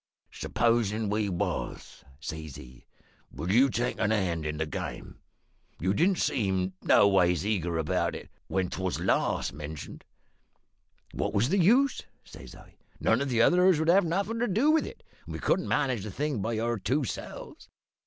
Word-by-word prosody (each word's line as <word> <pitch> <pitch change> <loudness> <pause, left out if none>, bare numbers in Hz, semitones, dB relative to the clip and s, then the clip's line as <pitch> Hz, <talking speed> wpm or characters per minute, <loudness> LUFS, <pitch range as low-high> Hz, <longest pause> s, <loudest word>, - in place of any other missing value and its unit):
"`Supposin' 110 -3 0
we 105 -1 0
was,' 90 -2 -4 0.2
says 80 -1 -7
he, 65 -1 -13 0.5
`would 85 +7 -3
you 130 +6 +5
take 120 0 -2
a - - +2
hand 90 -7 0
in 75 0 -3
the 80 - -1
game? 75 - -6 0.6
You 95 +3 +1
didn't 180 - +2
seem 95 - 0
noways 90 -3 +4
eager 90 -6 -1
about 80 -2 0
it - - -8 0.2
when 95 -1 0
'twas 95 -1 -2
last - - 0
mentioned.' 75 0 -8 1.1
"`What - - -2
was 110 +6 +2
the 195 +4 +2
use?' 245 +10 +4 0.2
says - - -12
I. - - -17 0.2
`None - - +2
of 140 - -1
the 115 -2 +3
others 180 0 +4
'd 160 +1 +1
have 195 +3 +6
nothin' 200 +7 -1
to 240 - +1
do 230 +11 +3
with 320 - +2
it, - - -11 0.2
and - - -6
we - - -5
couldn't 185 - 0
manage 130 -8 0
the 105 - -5
thing 140 +2 -2
by 115 +2 -2
our 115 0 -1
two 140 +9 0
selves. 120 - -7
110 Hz, 170 wpm, -28 LUFS, 90-150 Hz, 1.1 s, have